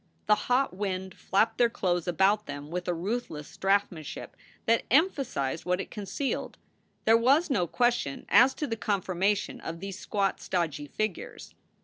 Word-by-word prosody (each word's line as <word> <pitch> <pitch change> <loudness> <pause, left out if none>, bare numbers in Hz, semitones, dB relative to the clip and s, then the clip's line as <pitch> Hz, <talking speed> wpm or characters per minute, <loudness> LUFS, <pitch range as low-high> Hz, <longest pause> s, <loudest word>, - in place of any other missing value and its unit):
The 210 +3 +2
hot 250 -4 +2
wind 190 -1 -3
flapped 220 +3 +1
their 240 -1 +5
clothes 175 -6 -1
about 195 +5 +2
them 145 +1 -7
with 180 0 -3
a 175 - +1
ruthless 175 -5 -4
draftsmanship 195 -6 -1 0.4
that 230 +1 +3
emphasized 265 - +1
what 180 +1 0
it - - -5
concealed. 215 +6 -3 0.5
There 225 - +6
was 275 +8 +3
no 180 -9 +2
question 240 - 0
as 265 +1 +6
to 300 - -2
the 230 - -2
conformation 200 -1 0
of 165 0 -6
these 195 +1 -6
squat, 200 -2 -1
stodgy 155 -5 -2
figures. 215 +3 -4
195 Hz, 150 wpm, -28 LUFS, 175-230 Hz, 0.5 s, There